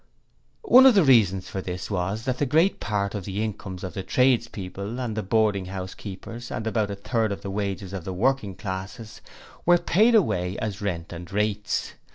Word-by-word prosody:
One 265 - +8
of 255 - +6
the 195 - +6
reasons 105 - +4
for 95 - -4
this 90 +2 -5
was 100 +4 -2
that 130 0 -2
a - - +4
great 160 +9 +3
part 100 -2 -1
of 100 -3 -4
the 100 +2 -2
incomes 100 -4 -5
of 95 - -5
the 95 - -4
tradespeople 115 -2 0
and 110 -6 -3
boarding 105 -4 +2
house 95 0 -6
keepers 115 +4 -8
and 110 - -4
about 110 -2 0
a 100 - -3
third 110 +2 -1
of 100 - -5
the 100 - -4
wages 100 -1 -3
of 95 -3 -5
the 95 - -5
working 105 0 0
classes 100 +3 -7 0.4
were 175 0 +5
paid 215 +7 +3
away 90 - +1
as 105 -2 -4
rent 90 -4 -3
and 85 0 -9
rates. 105 +1 -1
105 Hz, 195 wpm, -25 LUFS, 95-115 Hz, 0.4 s, One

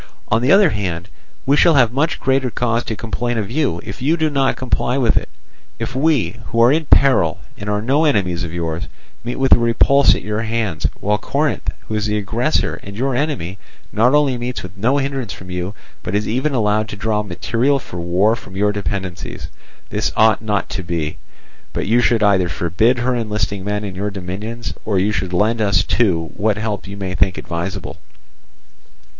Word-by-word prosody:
On 115 +2 +2
the 130 +4 +3
other 195 -5 +6
hand, 90 -3 -3 0.4
we 140 - +4
shall 165 +1 +5
have 125 -5 +5
much 155 +4 0
greater 130 -1 +1
cause 120 0 0
to 110 - -3
complain 120 +2 -3
of 105 -1 -3
you, 135 - 0
if 95 - -8
you 155 +6 +2
do 160 -1 +1
not 135 -2 +2
comply 130 0 -1
with 125 -4 +2
it; - - 0 0.5
if - - -5
we, 140 -5 +1
who 115 - -1
are 120 +2 +6
in 160 +2 +1
peril 120 - +4 0.2
and 100 - -6
are 105 0 -1
no 140 +7 +2
enemies 95 - +1
of 85 - -5
yours, 85 -1 -3 0.4
meet 120 +1 -3
with 135 0 0
a - - +8
repulse 120 +4 +4
at - - -5
your 105 +1 -2
hands, 110 -8 -1
while 105 +1 +1
Corinth, 150 +6 -1
who - - -8
is 105 0 0
the 105 0 0
aggressor 115 +8 0
and 100 +1 -9
your 130 +1 0
enemy, 125 - -2 0.3
not 125 +6 +4
only 140 -4 +2
meets 125 +1 -4
with 90 +2 -9
no 120 +8 +1
hindrance 135 -6 -2
from 90 0 -10
you, 90 +3 -4 0.3
but - - -3
is 105 +1 0
even 130 +5 0
allowed 110 -1 +1
to 105 - -5
draw 105 0 0
material 115 +8 0
for 105 -9 -8
war 90 +6 +2
from 95 -4 -11
your 105 +1 +2
dependencies. 100 -3 -4 0.4
This - - 0
ought 110 0 +4
not 105 -2 -1
to 95 - -3
be, 85 -3 -3 0.5
but - - -2
you 115 +4 +3
should 115 -2 +2
either 95 -4 +3
forbid 90 +10 +1
her 125 +1 0
enlisting 105 -4 -2
men 105 +1 -2
in 100 -2 -5
your 100 +3 -2
dominions, 105 +5 -5
or 105 -3 0
you 100 +3 +2
should 90 -2 -2
lend 110 +5 +1
us 100 -4 +3
too 85 -9 +1
what 105 +1 +1
help 105 -2 -3
you 100 +1 -7
may 95 -2 -4
think 95 -1 +1
advisable. 90 +1 -5
110 Hz, 200 wpm, -19 LUFS, 95-125 Hz, 0.5 s, a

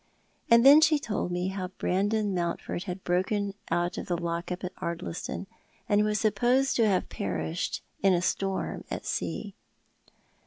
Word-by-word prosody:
And 235 +1 +6
then 290 +3 +9
she 315 -1 +5
told 215 -9 -3
me 180 +1 -1
how 190 -1 -3
Brandon 200 +3 0
Mountford 175 +1 -2
had 185 -1 -5
broken 195 +3 0 0.2
out 175 0 0
of - - -7
the 175 - 0
lock 170 +1 -3
up 180 +1 -4
at 180 0 -4
Ardliston, 170 +2 -4 0.4
and 210 -2 +3
was 210 0 +1
supposed 245 +6 +2
to 230 -2 +4
have 190 -3 +1
perished 80 -4 -3 0.2
in 195 - +5
a 175 -1 +2
storm 195 +1 -1
at - - -5
sea. - - -3
190 Hz, 160 wpm, -28 LUFS, 175-215 Hz, 0.4 s, then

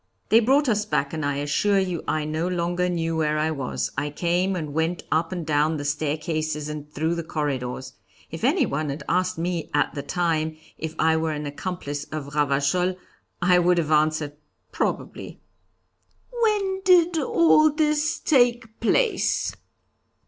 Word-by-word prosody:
They 225 - +7
brought 270 +5 +3
us 210 -3 +2
back, 140 -8 -1
and 155 -1 -3
I 145 0 0
assure 145 +8 +1
you 185 -3 -1
I 155 -1 0
no 155 +3 -2
longer 175 0 0
knew 165 -2 -1
where 155 -1 +1
I 155 +1 +1
was. 70 - -3
I 150 - -1
came 175 +5 0
and 155 -5 -4
went 160 +2 -1
up 165 +2 +1
and 175 -3 -4
down 155 +1 +1
the 145 - -5
staircases 155 +1 -2
and 150 -1 -7
through 160 +3 -1
the 170 0 -3
corridors. 130 -5 -3 0.4
If 165 - -7
anyone 245 - +1
had 140 +2 -5
asked 185 +2 0
me 170 -1 -2
at 145 - +1
the 140 - -4
time 160 0 -1 0.2
if 160 0 -5
I 160 0 +3
were 160 -1 -1
an 150 0 -4
accomplice 145 -1 -5
of 150 -2 -7
Ravachol, 145 +5 +1 0.5
I 180 0 +5
would 175 0 +3
have 155 -2 0
answered, 155 -1 +2 0.4
'Probably.'" - - -3 0.9
"When 420 -5 0
did 350 -3 +5
all 310 +1 +4
this 300 0 +1
take 240 -5 +2
place?" 465 - +1
160 Hz, 160 wpm, -24 LUFS, 150-185 Hz, 0.9 s, They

